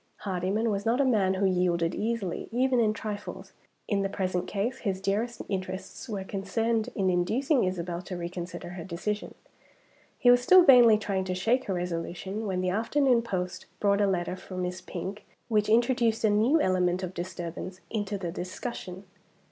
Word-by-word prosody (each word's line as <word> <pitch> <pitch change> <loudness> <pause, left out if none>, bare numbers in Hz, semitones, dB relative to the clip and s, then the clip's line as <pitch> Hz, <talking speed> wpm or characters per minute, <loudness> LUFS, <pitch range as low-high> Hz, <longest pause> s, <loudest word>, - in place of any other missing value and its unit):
Hardyman 195 +4 0
was 200 0 -1
not 230 +4 +1
a 280 - +4
man 200 -7 +2
who 195 +1 +1
yielded 180 -2 +1
easily, 215 -5 -2
even 255 +1 +2
in 220 -2 +3
trifles. 210 -1 -6 0.3
In 200 -3 +1
the 195 - -1
present 185 -2 -2
case, 215 +6 -2
his 195 -4 -2
dearest 210 +5 -1
interests 190 +5 -5
were 200 -3 -3
concerned 225 +4 -1
in 190 -2 +2
inducing 235 - +2
Isabel 175 -1 -3
to 180 0 -6
reconsider 175 0 -6
her 175 -1 -7
decision. 190 +5 -4 0.8
He 245 - +6
was 245 0 +5
still 370 +8 +7
vainly 245 -7 +8
trying 200 -3 -2
to 185 -1 -2
shake 235 +8 +1
her 190 - -1
resolution, 180 +4 -4
when 185 -2 -1
the 185 0 0
afternoon 240 +4 +2
post 185 -6 -4
brought 200 0 +3
a 200 - +4
letter 180 -1 -1
for 185 0 -9
Miss 180 0 -3
Pink 195 +3 -6 0.3
which 215 -2 +2
introduced 235 0 +3
a 215 - +4
new 230 +10 +4
element 185 -5 +1
of 185 0 -4
disturbance 175 +1 -6
into 205 -2 -2
the 175 -3 -4
discussion. 185 +1 -6
195 Hz, 170 wpm, -28 LUFS, 185-225 Hz, 0.8 s, vainly